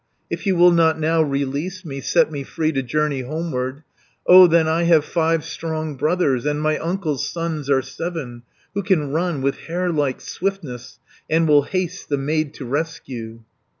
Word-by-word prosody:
"If - - -4
you 190 - +3
will 175 +1 +6
not 160 -2 +3
now 160 +1 +2
release 145 +6 -2
me, 135 -3 -6
Set 155 - +2
me 145 -2 -4
free 155 +3 -1
to 135 -3 -1
journey 140 +1 -1
homeward, 140 -1 -4 0.4
230 180 - +7
O 185 -1 +10
then 165 -1 +3
I 165 +2 +1
have 165 -3 +4
five 165 -2 0
strong 160 -2 -4
brothers, 150 -4 +1
And 150 0 -1
my 155 0 0
uncle's 160 -5 -2
sons 160 -3 -4
are 135 -2 +3
seven, 135 -4 -6 0.3
Who 200 - -1
can 170 -8 +1
run 165 -3 -1
with 140 0 0
hare 175 +2 -1
like 145 -5 0
swiftness, 155 -11 -5 0.3
And 160 +1 +3
will 145 -1 +6
haste 185 +4 -4
the 145 - +1
maid 150 +2 -1
to 135 - -7
rescue." 125 -5 -4
155 Hz, 180 wpm, -21 LUFS, 140-170 Hz, 0.4 s, O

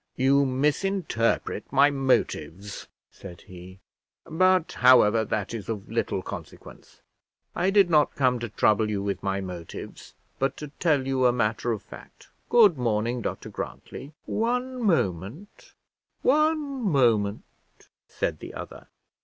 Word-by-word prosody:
"You 135 +2 +3
misinterpret 145 -1 -1
my 140 +2 +5
motives," 105 - -1 0.2
said 90 -3 -12
he; 95 +1 -13 0.4
"but, 185 +1 +2
however, 120 -3 +5
that 105 0 -3
is 110 -4 -6
of 105 -2 -5
little 115 -4 -1
consequence. 90 -6 -11 0.5
I 185 - +1
did 195 -2 +5
not 150 -2 +3
come 125 -3 +2
to 120 0 -5
trouble 110 +1 +2
you 100 -2 -2
with 100 -1 -3
my 100 0 -2
motives, 90 -3 -9 0.2
but 135 0 -1
to 150 - -7
tell 150 -6 +2
you 130 -1 +2
a - - +4
matter 120 0 -1
of 110 - -4
fact. - - -14 0.2
Good 210 - +5
morning, 120 +1 -1
Dr - - -5
Grantly." 140 +3 -8
"One 250 +3 -2
moment, 145 - -2 0.5
one 300 -1 +1
moment," 115 - +2 0.6
said - - -3
the - - -9
other. - - -9
125 Hz, 130 wpm, -26 LUFS, 105-165 Hz, 0.6 s, my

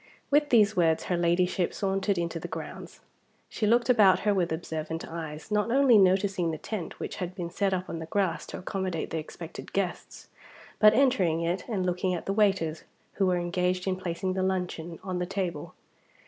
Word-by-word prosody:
With 295 +1 +4
these 215 -3 +4
words, 165 -3 +2
her 180 - -1
Ladyship 175 +1 +1
sauntered 195 0 0
into 170 -1 -2
the - - -6
grounds. - - -8 0.5
She 215 - -1
looked 235 +2 +3
about 210 -7 +5
her 210 0 +2
with 180 -4 0
observant 160 0 -4
eyes; 160 +1 -7
not 210 +1 +1
only 255 -3 +5
noticing 190 -2 +3
the 160 - -3
tent 200 -1 -6
which - - -5
had 180 -1 -4
been 175 -3 -5
set 195 +2 0
up 185 -1 -2
on 165 - -5
the 160 - -7
grass 195 0 -1
to - - -6
accommodate 185 -3 -3
the 165 - -1
expected 160 +1 -9
guests, 195 -3 -3 0.5
but 215 0 +7
entering 200 -12 +3
it, 175 +2 -1
and 195 -5 -1
looking 180 +1 0
at 170 - -6
the 195 - -1
waiters 190 -7 +1 0.4
who 190 - +4
were 180 -1 +2
engaged 180 +1 -1
in 190 -1 0
placing 185 +1 -3
the 190 - -1
luncheon 180 -3 -2
on 185 -2 -3
the 180 - -2
table. 180 -5 -4
185 Hz, 190 wpm, -28 LUFS, 170-200 Hz, 0.5 s, but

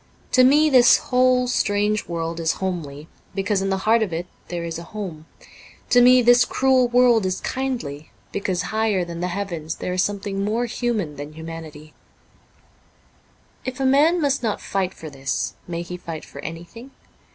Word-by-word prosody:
To 255 - +5
me 295 +4 +5
this 250 -2 +7
whole 250 0 +2
strange 210 -2 0
world 165 -1 -3
is 160 -1 +1
homely, 160 -6 -5 0.3
because 195 0 0
in 195 - -1
the 195 - +1
heart 225 +1 +4
of 210 -5 -1
it 165 +2 -3 0.2
there 175 -1 -4
is 165 -1 -4
a - - -8
home; 165 -6 -6 0.6
to 245 - +6
me 250 0 +6
this 245 +1 +6
cruel 260 -1 +2
world 240 -2 +4
is 185 0 -1
kindly, 235 - -4 0.2
because 190 -3 -2
higher 215 -4 +1
than 170 -1 -7
the 180 - -1
heavens 175 -4 -4
there 180 - -4
is 180 - +1
something 200 0 -2
more 220 +4 0
human 220 - -2
than 145 +2 -7
humanity. 160 -1 -9 1.7
If 260 0 -5
a 270 - 0
man 295 +6 +4
must 280 -3 +1
not 220 -3 -1
fight 190 -1 -2
for 155 -2 -9
this, 135 -8 -3
may 170 -1 -4
he 180 +1 -7
fight 165 -3 -7
for - - -12
anything 175 +10 -9
195 Hz, 175 wpm, -22 LUFS, 165-245 Hz, 1.7 s, this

